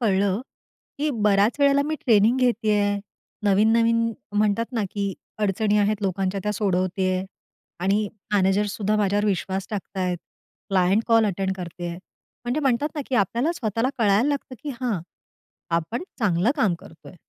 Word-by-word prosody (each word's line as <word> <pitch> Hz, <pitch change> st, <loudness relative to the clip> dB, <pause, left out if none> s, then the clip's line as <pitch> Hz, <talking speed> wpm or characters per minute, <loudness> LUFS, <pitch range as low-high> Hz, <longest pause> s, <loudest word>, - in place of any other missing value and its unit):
कळलं, 200 Hz, -2 st, +2 dB, 0.6 s
की 300 Hz, +1 st, +1 dB
बऱ्याच 205 Hz, +3 st, +3 dB
वेळेला 280 Hz, 0 st, +5 dB
मी 310 Hz, +2 st, -2 dB
ट्रेनिंग 225 Hz, +1 st, +4 dB
घेते 235 Hz, -4 st, +2 dB
आहे, 205 Hz, 0 st, +1 dB, 0.5 s
नवीन-नवीन 230 Hz, +3 st, +3 dB, 0.3 s
म्हणतात 215 Hz, +4 st, +1 dB
ना, 225 Hz, -4 st, 0 dB
की 200 Hz, -1 st, -2 dB, 0.3 s
अडचणी 210 Hz, +1 st, +1 dB
आहेत 205 Hz, 0 st, +1 dB
लोकांच्या 195 Hz, 0 st, -1 dB
त्या 210 Hz, -, -1 dB
सोडवते 185 Hz, -2 st, 0 dB
आहे 185 Hz, +1 st, -1 dB, 0.6 s
आणि 205 Hz, +2 st, +2 dB, 0.3 s
मॅनेजर 195 Hz, +1 st, +3 dB
सुद्धा 210 Hz, +1 st, -1 dB
माझ्यावर 205 Hz, 0 st, +1 dB
विश्वास 190 Hz, -1 st, -1 dB
टाकत 200 Hz, -1 st, -6 dB
आहेत. 180 Hz, -1 st, 0 dB, 0.5 s
क्लायंट 195 Hz, +2 st, +3 dB
कॉल 225 Hz, -2 st, +4 dB
अटेंड 190 Hz, -1 st, -1 dB
करत 175 Hz, -1 st, -8 dB
आहे. 170 Hz, -1 st, -4 dB, 0.5 s
म्हणजे 245 Hz, +6 st, -1 dB
म्हणतात 275 Hz, +2 st, +1 dB
ना, 300 Hz, -, -2 dB
की 265 Hz, -, -2 dB
आपल्याला 240 Hz, -, +1 dB
स्वतःला 230 Hz, -, -1 dB
कळायला 215 Hz, +4 st, +3 dB
लागतं 280 Hz, -2 st, -3 dB
की 295 Hz, -, -4 dB
हां, 230 Hz, -8 st, -1 dB, 0.8 s
आपण 195 Hz, -, -4 dB, 0.2 s
चांगलं 200 Hz, -1 st, +2 dB
काम 215 Hz, -9 st, +2 dB
करतोय. 160 Hz, -, -14 dB
210 Hz, 155 wpm, -24 LUFS, 195-230 Hz, 0.8 s, वेळेला